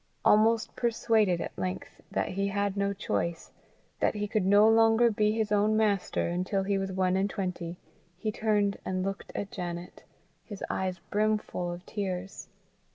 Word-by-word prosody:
Almost 220 +1 +4
persuaded 220 -6 +2
at - - -5
length 90 -1 -5
that - - -1
he 195 +2 -1
had 200 0 -1
no 200 0 0
choice, 170 -4 -3 0.5
that - - +1
he 210 0 -2
could 205 -2 0
no 205 +2 +6
longer 225 +1 +5
be 210 0 +2
his 220 -1 -1
own 210 +1 +3
master, 205 -3 +1
until 185 +3 -1
he 195 0 0
was 195 0 -3
one 185 0 +1
and 195 +1 +1
twenty, 180 -4 -4 0.4
he 215 +3 -2
turned 210 -2 +1
and 185 0 -2
looked 195 0 -5
at 200 - -4
Janet, 175 -1 -6 0.4
his 205 -4 -8
eyes 185 -1 -2
brimful 210 -4 0
of 175 +1 -8
tears. 190 -2 -4
200 Hz, 160 wpm, -29 LUFS, 185-215 Hz, 0.5 s, no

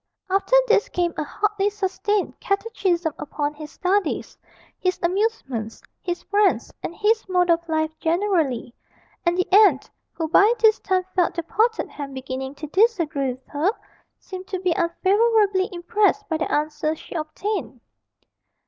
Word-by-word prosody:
After 395 +6 +2
this 435 -3 +3
came 345 -1 -1
a 310 - -2
hotly 415 +5 0
sustained 410 0 -2
catechism 385 -6 -1
upon 295 0 -3
his 300 0 -9
studies, 375 -1 -1 0.4
his 365 -1 0
amusements, 345 - -1 0.2
his 350 -1 -4
friends, 410 -1 +1
and 340 - -5
his 435 -1 +1
mode 360 -1 +3
of 335 0 0
life 315 0 0
generally, 325 - 0 0.5
and 345 +1 +2
the 365 - +1
aunt 390 -10 +5 0.2
who 325 - -3
by 400 +7 +5
this 440 0 +4
time 370 -1 0
felt 355 -2 +2
the 335 - -2
potted 450 +7 0
ham 280 -2 -7
beginning 265 +1 -5
to 305 - -7
disagree 320 - +1
with 255 +1 -18
her 300 +6 0 0.5
seemed 370 0 -9
to 375 - -3
be 365 -1 0
unfavourably 395 +2 +2
impressed 415 +3 +1
by 320 - -1
the - - -3
answers 305 +1 -1
she - - -11
obtained. 320 - -4
360 Hz, 150 wpm, -23 LUFS, 310-410 Hz, 0.5 s, aunt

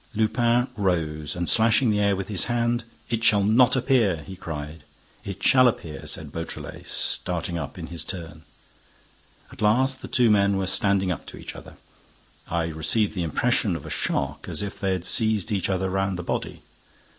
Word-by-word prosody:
Lupin 120 +3 +2
rose, 80 -6 -1
and 85 -1 -2
slashing 115 +1 +4
the 105 - +1
air 100 -1 +3
with 95 0 -4
his 100 -4 0
hand, 120 0 0 0.3
"It 115 -1 -1
shall 105 -3 +4
not 115 +5 +5
appear!" 120 - +2
he 95 - -8
cried. 75 -3 -7 0.4
"It 100 -2 -7
shall 130 -1 +6
appear!" 80 -9 -3
said - - -4
Beautrelet, - - -7
starting 85 -1 0
up 70 - -6
in - - -6
his 85 -3 -2
turn. 80 -3 -7 1.1
At - - -12
last, 130 +5 +2
the - - -7
two 120 -3 +3
men 100 -1 +3
were 95 - -1
standing 95 0 +2
up 85 - -5
to - - -9
each - - -8
other. - - -11 0.7
I 85 -1 -1
received 85 +7 +1
the 90 - -3
impression 80 -4 +1
of - - -7
a - - -7
shock, - - -2
as - - -2
if 100 - -6
they 95 -2 0
had 90 -2 -3
seized 110 0 +2
each 100 -3 0
other 95 0 0
round 95 0 -1
the 90 - -5
body. - - -4
100 Hz, 185 wpm, -25 LUFS, 85-110 Hz, 1.1 s, shall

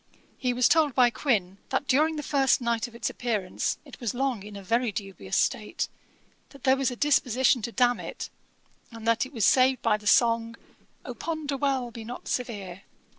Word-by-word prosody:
He 250 -2 0
was 245 0 +3
told 310 -5 +3
by 245 -2 +5
Quin, 200 -9 -1
that 265 +1 -1
during 310 +4 +3
the 300 - -4
first 270 -1 +2
night 235 -1 -1
of 235 - -15
its 235 - -2
appearance 215 -7 -2
it - - -13
was 240 -3 -3
long 260 -4 -1
in 205 +1 -10
a 200 - -8
very 230 +4 +1
dubious 195 -1 -4
state; - - 0 0.6
that 275 -3 -16
there 265 -1 +5
was 270 -1 0
a 245 - -5
disposition 260 -3 +2
to 235 - -4
damn 245 0 +2
it, - - -7 0.6
and 230 -1 -8
that 230 +3 +2
it - - -18
was 225 -7 0
saved 255 -1 +4
by 215 -2 +3
the 210 -1 -9
song, 230 0 +3 0.5
'Oh - - -5
ponder 310 -4 -3
well! 265 -3 -1
be 230 -1 -8
not 240 +3 -8
severe!' 200 -7 -4
245 Hz, 195 wpm, -27 LUFS, 225-265 Hz, 0.6 s, by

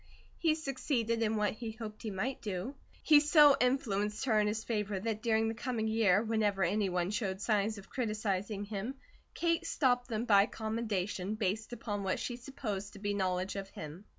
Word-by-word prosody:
He 320 -3 +3
succeeded 260 -6 -1
in 220 -1 +1
what 210 -1 +1
he 220 0 -6
hoped 215 -1 -8
he 220 - -4
might 210 +7 -3
do. 200 +4 -3 0.3
He 300 -2 +7
so 295 -1 +7
influenced 210 -4 0
her 220 -4 +3
in 210 - +2
his 220 +1 -2
favour 210 -3 -2
that 220 +1 -2
during 225 -1 +2
the 225 - -1
coming 230 -1 -2
year 220 -2 +3
whenever 215 -3 +1
any 200 +3 +1
one 180 +1 0
showed 200 -3 -2
signs 215 0 +1
of 200 - -11
criticising 210 -4 -2
him, 210 +5 -4 0.4
Kate 335 0 +1
stopped 245 -6 +1
them 230 -1 -2
by 200 -2 +6
commendation, 215 -3 -2
based 215 +1 -2
upon 205 -4 -4
what 190 -1 -1
she 245 - -3
supposed 230 -6 -5
to - - -11
be 205 0 -1
knowledge 185 -1 -1
of 195 -1 -5
him. 160 +5 -9
215 Hz, 185 wpm, -32 LUFS, 200-235 Hz, 0.4 s, He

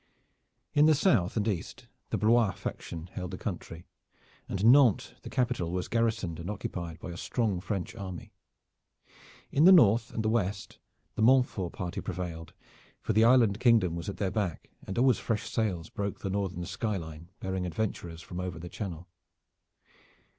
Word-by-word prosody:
In 150 0 +5
the 155 - +6
south 135 - +2
and 105 0 0
east 95 -6 -3 0.2
the - - -1
Blois 110 -2 +3
faction 80 -1 -6
held 90 -1 -4
the 90 - -6
country, 85 -4 -6 0.6
and 95 +2 -1
Nantes 125 -2 +5
the - - -8
capital 120 -9 0
was 90 0 -2
garrisoned 110 -8 0
and 85 - -5
occupied 85 -5 -5
by 90 - -7
a 85 - -7
strong 105 -2 -1
French 95 -2 -3
army. 95 -5 -7 1.2
In 150 +4 +4
the 190 - +10
north 115 - +6
and 110 - -3
west 105 -3 -1 0.3
the 115 - -3
Montfort 120 -7 +3
party 90 +2 -4
prevailed, 85 -3 -5 0.5
for 110 - -2
the 110 +2 +5
island 115 -4 +5
kingdom 115 -9 +4
was 85 +3 -4
at 100 - -6
their 95 -2 -1
back 95 -7 -3 0.2
and 95 - -5
always 130 +1 +4
fresh 110 -3 -2
sails 95 -8 -2
broke 100 -1 -4
the 95 - -3
northern 95 -3 -2
sky 105 +3 -2
line 80 0 -9
bearing 95 -1 -2
adventurers 85 -3 -4
from 90 +1 -7
over 90 -2 -4
the 85 +2 -8
channel. 90 -4 -6
100 Hz, 165 wpm, -29 LUFS, 90-115 Hz, 1.2 s, the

